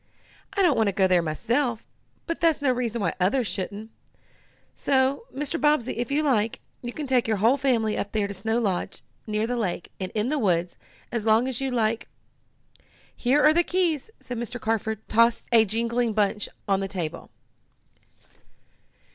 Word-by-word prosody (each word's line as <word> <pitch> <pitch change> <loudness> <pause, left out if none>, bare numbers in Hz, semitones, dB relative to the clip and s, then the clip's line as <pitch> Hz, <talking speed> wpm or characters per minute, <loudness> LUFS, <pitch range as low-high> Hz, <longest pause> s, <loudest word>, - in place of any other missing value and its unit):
"I 395 - +2
don't 335 -7 +4
want 220 - +2
to 200 - +1
go 190 0 +3
there 180 -2 +4
myself, 230 - -1 0.4
but 335 - -4
that's 330 -3 +3
no 285 -3 +2
reason 240 -2 -2
why - - +1
others 215 +8 +2
shouldn't. 205 +2 -5 0.8
So, 270 - +1
Mr. 295 +4 -3
Bobbsey, 295 -5 +2
if 240 +2 -2
you 300 +2 +2
like, 230 -6 +1 0.2
you 240 - -5
can 300 +4 -5
take 255 -3 +2
your 220 -1 +1
whole 225 +7 +4
family 240 -6 +1
up 205 - -3
there 210 -2 0
to 200 - -6
Snow 220 +4 -1
Lodge, 195 -7 -2 0.2
near 215 0 0
the 245 +1 -2
lake, 185 -6 -3
and 185 -1 -4
in 215 +3 0
the 300 0 0
woods, 175 -5 +1
and - - -29
stay 240 - -2
as 220 - -4
long 220 +3 +4
as 260 -1 -3
you 270 - 0
like. 230 -1 0 1.1
Here 265 +4 +2
are 305 - +7
the 345 - +4
keys!" 345 -3 0 0.2
and 245 -2 -4
Mr. 245 +1 -5
Carford 220 -1 -2
tossed 230 +1 +3
a 225 -2 +6
jingling 230 +2 0
bunch 210 0 0 0.2
on 195 -1 +2
the 195 - -2
table. 170 -4 -5
230 Hz, 185 wpm, -25 LUFS, 210-265 Hz, 1.1 s, are